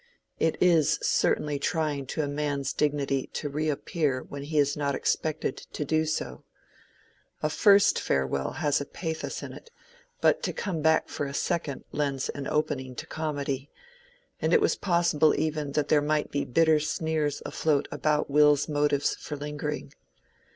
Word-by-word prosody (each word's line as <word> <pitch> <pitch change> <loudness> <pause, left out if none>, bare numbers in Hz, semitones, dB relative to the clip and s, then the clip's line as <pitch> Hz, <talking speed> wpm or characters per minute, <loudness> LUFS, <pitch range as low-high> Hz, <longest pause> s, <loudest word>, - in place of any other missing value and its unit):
It 160 - +1
is 170 -5 +4
certainly 145 -2 +1
trying 145 -3 -1
to 155 - -2
a - - -1
man's 145 -2 -2
dignity 140 -2 0
to 145 - -3
reappear 150 -1 -1
when 140 - -8
he 150 +2 -3
is 145 -1 +3
not 140 -2 -1
expected 155 -4 -1
to 150 - -6
do 155 +2 +1
so: 155 - -3 1.0
a 155 - +1
first 200 +3 +5
farewell 65 0 -1
has 145 -3 +1
pathos 160 -3 -4
in - - -7
it, - - -12 0.5
but - - +3
to - - -2
come 180 -7 -3
back 160 +1 +3
for 145 - -3
a 140 - -6
second 160 -6 -2
lends 140 -3 -1
an 140 -1 -4
opening 140 -4 -1
to - - -6
comedy, 145 -3 -3 0.7
and - - +1
it 470 - +7
was 425 - +2
possible 170 -4 +2
even 150 -2 -2
that 150 -1 0
there 150 - +5
might 150 0 0
be 145 - -1
bitter 160 +3 +4
sneers 155 -1 -1
afloat 150 -3 0
about 150 0 +1
Will's 145 0 +4
motives 145 -2 +1
for 150 - -6
lingering. 150 - -5
150 Hz, 160 wpm, -27 LUFS, 140-155 Hz, 1.0 s, it